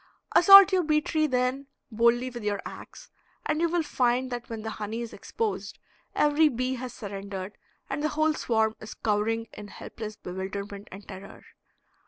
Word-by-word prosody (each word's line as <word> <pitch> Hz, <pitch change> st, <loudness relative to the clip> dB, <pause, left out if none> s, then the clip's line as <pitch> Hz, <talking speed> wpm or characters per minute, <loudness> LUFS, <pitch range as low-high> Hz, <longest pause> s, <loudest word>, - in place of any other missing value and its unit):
Assault 395 Hz, +2 st, +10 dB
your 375 Hz, -1 st, +3 dB
bee 305 Hz, -2 st, +2 dB
tree, 310 Hz, -1 st, 0 dB
then, 255 Hz, +1 st, -1 dB, 0.2 s
boldly 235 Hz, +3 st, +2 dB
with 240 Hz, -2 st, -8 dB
your 205 Hz, -1 st, -1 dB
ax, -, -, -10 dB, 0.3 s
and 305 Hz, +1 st, 0 dB
you 340 Hz, -, +2 dB
will 345 Hz, 0 st, +1 dB
find 255 Hz, -2 st, 0 dB
that 240 Hz, -1 st, -5 dB
when 225 Hz, -2 st, -6 dB
the 220 Hz, -, -4 dB
honey 215 Hz, +2 st, -5 dB
is 235 Hz, -, -6 dB
exposed 450 Hz, -2 st, -4 dB, 0.4 s
every 300 Hz, +1 st, +4 dB
bee 255 Hz, 0 st, -2 dB
has 255 Hz, -1 st, -5 dB
surrendered 200 Hz, -2 st, -7 dB, 0.3 s
and 275 Hz, +2 st, -3 dB
the 305 Hz, -, +1 dB
whole 310 Hz, +1 st, +1 dB
swarm 220 Hz, -6 st, 0 dB
is 220 Hz, -, -9 dB
cowering 225 Hz, +2 st, 0 dB
in 210 Hz, -, -9 dB
helpless 215 Hz, +1 st, -8 dB
bewilderment 200 Hz, +2 st, -6 dB
and 195 Hz, +2 st, -11 dB
terror. 195 Hz, 0 st, -10 dB
240 Hz, 170 wpm, -27 LUFS, 210-300 Hz, 0.4 s, Assault